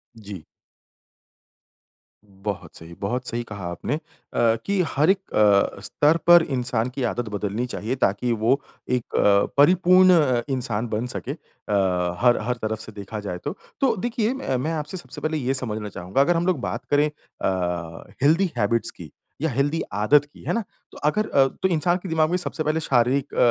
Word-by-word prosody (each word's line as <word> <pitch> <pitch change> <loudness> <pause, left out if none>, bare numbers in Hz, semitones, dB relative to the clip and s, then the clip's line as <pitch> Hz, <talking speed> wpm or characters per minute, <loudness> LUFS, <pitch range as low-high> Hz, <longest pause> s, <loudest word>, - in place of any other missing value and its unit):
जी। 100 -6 -9 1.8
बहुत 100 -1 -7
सही, 80 +1 -11
बहुत 125 +5 -3
सही 120 +1 -2
कहा 100 -4 -7
आपने। 115 - -3
अ, - - -4 0.7
कि 200 -2 +1
हर 150 +6 +3
एक 195 - +5 0.2
अ, 100 -2 +3
स्तर 150 +9 +2
पर 175 -1 +8
इंसान 125 -4 -1
की 135 - -2
आदत 120 -1 -2
बदलनी 105 +3 -2
चाहिए 120 +1 -3
ताकि 120 0 0
वो 130 +5 +3 0.3
एक 125 -2 -2
अ, 100 0 +4
परिपूर्ण 185 +4 +6
अ, 125 -4 +1
इंसान 120 -4 -1
बन 110 +2 -2
सके, 130 - -4
अ, 90 - -2
हर 120 -1 +4
हर 125 - +1
तरफ 110 0 -2
से 110 - -9
देखा 105 +1 -7
जाए 95 -3 -5
तो। - - -3 0.3
तो 250 -5 +3
देखिए 240 +2 -1
मै 135 - -2
मैं 155 +6 -2
आपसे 155 +4 -4
सबसे - - -8
पहले 155 0 -1
ये 130 -1 0
समझना 110 -5 -3
चाहूँगा 95 +9 -1
अगर 170 +5 +3
हम 170 +1 0
लोग 175 -7 +1
बात - - -4
करें 150 +1 +4
अ, 90 - -4 0.2
हेल्दी 165 +4 +3
हैबिट्स 115 +3 +1
की - - -12 0.3
या 160 - +1
हेल्दी 145 +6 0
आदत 120 +8 +4
की, 145 - -18
है - - -1
ना। 230 - 0 0.3
तो - - -13
अगर 215 +7 +1
अ, 135 -1 +4
तो 190 - -2
इंसान 175 +2 +2
के 185 - -5
दिमाग 160 -1 +2
में 180 - +1
सबसे 165 -3 -3
पहले 155 +1 0
शारीरिक 135 0 +1
अ, - - -6
125 Hz, 185 wpm, -23 LUFS, 105-155 Hz, 1.8 s, पर